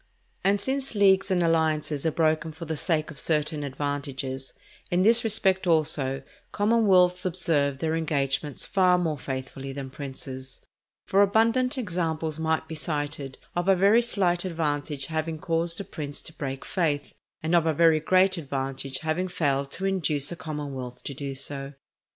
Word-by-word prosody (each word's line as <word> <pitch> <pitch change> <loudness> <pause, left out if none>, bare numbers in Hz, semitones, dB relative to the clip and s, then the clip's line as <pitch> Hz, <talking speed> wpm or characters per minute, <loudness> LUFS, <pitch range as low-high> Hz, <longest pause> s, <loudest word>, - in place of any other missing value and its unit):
And 200 +1 +3
since 270 0 -1
leagues 195 -1 +4
and 180 -2 +2
alliances 160 -2 +1
are - - +2
broken 160 0 +1
for 165 +2 -8
the 160 0 -3
sake 155 -1 0
of 145 - -9
certain 150 -1 -1
advantages, 140 -1 -4 0.4
in 180 +1 +2
this 230 +3 +6
respect 195 -4 +2
also, 145 -5 +2 0.3
commonwealths 195 -5 +3
observe 165 -6 +1
their 160 +2 -1
engagements 145 -3 -1
far 185 -2 +3
more 160 -5 -1
faithfully 135 +1 -5
than 135 -1 -6
princes; 130 -1 -7 0.5
for 195 - +3
abundant 230 +6 +3
examples 165 -7 -2
might 160 0 0
be 160 - -7
cited 145 -3 -3 0.2
of 175 +1 -1
a 195 - +6
very 200 +5 +5
slight 185 -7 0
advantage 150 -5 -1
having 160 0 -2
caused 165 +1 0
a - - -3
prince 150 -6 -6
to 160 - -6
break 135 -4 -5
faith, 150 -6 -1 0.3
and 160 +2 0
of 170 -2 +4
a - - +4
very 160 0 +5
great 185 +3 +3
advantage 135 -2 -3
having 160 +4 -1
failed 140 -6 0
to 190 - -2
induce 165 -7 +1
a - - -4
commonwealth 145 -7 -6
to 140 - -5
do 140 0 -5
so. 140 +1 -4
160 Hz, 160 wpm, -26 LUFS, 145-180 Hz, 0.5 s, this